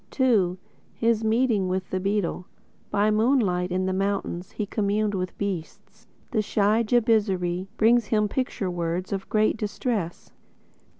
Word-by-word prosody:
II 205 -9 +3 0.4
(His 230 -1 +1
Meeting 220 -3 +2
With 185 0 -3
The 185 - 0
Beetle) 195 -2 -1 0.4
By 205 +1 +2
moonlight 210 -6 +2
in 185 +1 0
the 190 - 0
mountains 195 -2 -2
He 210 - -2
communed 210 0 0
with 185 -2 -3
beasts. 190 -5 -6 0.2
The 220 -4 +2
shy 210 +1 +2
Jabizri 205 -6 +1
brings 230 +1 +4
him 210 -1 +2
picture 205 -5 -2
words 175 +2 -2
Of 195 -1 -4
great 215 +1 +2
distress. 210 -4 -3
205 Hz, 135 wpm, -25 LUFS, 185-220 Hz, 0.4 s, brings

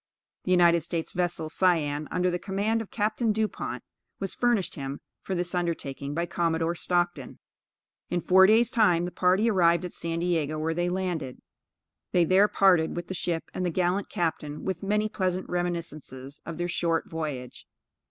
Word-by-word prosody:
The - - -3
United 170 -1 +5
States 165 +1 -3
vessel 175 -3 -1
Cyane, 155 -4 +1
under 180 0 +1
the 175 - -2
command 205 +4 -1
of 225 - -8
Capt. 215 0 -1
Dupont, 215 0 -3 0.4
was 195 -2 -3
furnished 240 -6 +1
him 140 -1 -5 0.2
for 190 - -3
this 175 0 -2
undertaking 145 -5 -3
by 170 +1 0
Commodore 165 -1 0
Stockton. 175 -5 -1 0.7
In 175 - 0
four 190 +2 +6
days 225 +3 +4
time 180 -8 +3
the 180 - -4
party 185 +6 +2
arrived 175 -4 +3
at 180 - -7
San 165 0 -3
Diego, 165 -3 0
where 160 +1 -1
they 175 +1 0
landed. 175 -8 -3 0.8
They 175 -1 +4
there 190 +4 +5
parted 180 -6 +3
with 175 0 -5
the - - -2
ship 170 -2 -2
and 185 - -3
the 180 - +1
gallant 180 +3 0
captain, 155 -3 -3
with 190 -3 -2
many 210 +2 +1
pleasant 185 -3 -2
reminiscences 155 -6 -4
of 165 -1 -5
their 175 0 -1
short 170 -1 0
voyage. 150 -6 -5
175 Hz, 170 wpm, -27 LUFS, 165-185 Hz, 0.8 s, four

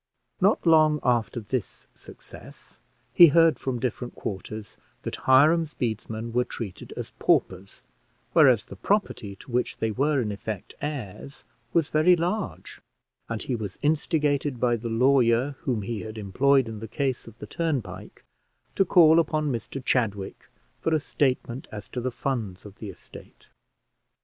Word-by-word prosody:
Not 195 +1 +3
long 155 -2 +5
after 120 -1 +1
this 115 0 -5
success, - - -14 0.3
he 175 - +9
heard 165 +1 +4
from 130 -2 -2
different 125 0 -4
quarters 105 +1 -6 0.3
that - - -4
Hiram's 150 +4 +5
bedesmen 110 0 -4
were 125 +1 +3
treated 110 -6 -8
as - - -6
paupers, 95 +1 0 0.5
whereas - - +5
the - - -10
property 100 -1 -1
to 120 - -14
which 125 +1 -1
they 110 - -1
were, 140 +5 +1
in 110 -4 -1
effect, 100 -1 -6
heirs 140 -2 -6 0.3
was 165 0 +1
very 160 +4 +5
large; 180 +5 -4 0.5
and 115 -2 -3
he 130 - -2
was 105 -4 -6
instigated 145 -3 0
by 120 -1 +2
the 115 +1 -5
lawyer 125 +1 +3
whom 120 -6 -2
he 115 +1 -4
had 110 0 -8
employed 130 +6 +2
in 110 -1 -6
the 110 - -7
case 135 +1 -2
of 115 0 -13
the - - -8
turnpike 130 - -4 0.5
to - - +3
call 165 -3 +6
upon 155 -2 0
Mr 125 +2 -5
Chadwick 105 -6 -1 0.3
for 160 - +1
a - - +2
statement 130 -4 -1
as 105 -1 -8
to 125 - -4
the 130 - -1
funds 115 -7 -4
of 105 -1 -12
the 105 - -6
estate. 95 - -14
125 Hz, 155 wpm, -26 LUFS, 110-150 Hz, 0.5 s, he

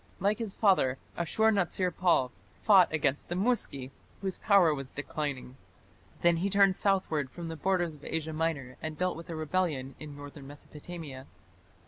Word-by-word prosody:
Like 200 +4 +1
his 220 -4 -3
father, 185 - +3 0.2
Ashur 220 +6 +2
natsir 185 -2 0
pal 170 -8 +3 0.3
fought 195 -5 +6
against 145 -3 0
the 175 - -2
Muski, 185 - 0 0.3
whose 190 -2 -3
power 195 -7 +5
was 135 -2 -5
declining. 145 -3 -4 0.7
Then 170 -1 +5
he 190 +4 0
turned 195 -1 +4
southward 180 -9 +1
from 170 +3 -7
the 165 - -5
borders 175 0 0
of 145 -1 -16
Asia 160 0 -3
Minor 155 -5 -2
and 155 -1 -5
dealt 180 +1 0
with 165 +1 -10
a 165 - -4
rebellion 155 -4 -1
in 150 -2 -9
northern 145 -1 -10
Mesopotamia. 145 -1 -9
165 Hz, 160 wpm, -30 LUFS, 145-185 Hz, 0.7 s, fought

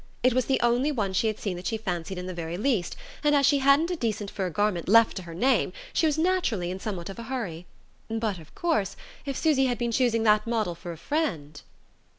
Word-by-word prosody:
It 255 0 +4
was 255 0 +1
the 265 - +1
only 245 +5 +2
one 205 -8 -1
she 220 - +2
had 215 -1 -1
seen 195 -4 -3
that 180 - -5
she 225 - -1
fancied 180 -4 -4
in 180 - -5
the 185 - -5
very 170 0 -4
least, 215 -4 0 0.3
and 295 0 +4
as 280 -1 +4
she 285 +1 +4
hadn't 280 +6 +4
a - - 0
decent 215 -8 -2
fur 190 -3 -2
garment 190 -2 0
left 230 +1 +6
to - - -3
her 170 -2 -9
name 260 +9 +2 0.2
she 320 - +3
was 305 0 0
naturally 315 - +1
in 185 - -5
somewhat 190 -4 -5
of 195 - -10
a - - -5
hurry... 180 -10 -4 0.4
but, 220 -4 -2
of 160 -1 -16
course, 315 - 0 0.3
if 275 - -2
Susy 290 -5 +3
had 245 -1 -1
been 235 -1 -1
choosing 230 -2 +2
that 215 0 +3
model 220 -6 0
for 175 +1 -8
a 165 - -8
friend.... 155 - -2
220 Hz, 235 wpm, -27 LUFS, 180-265 Hz, 0.4 s, left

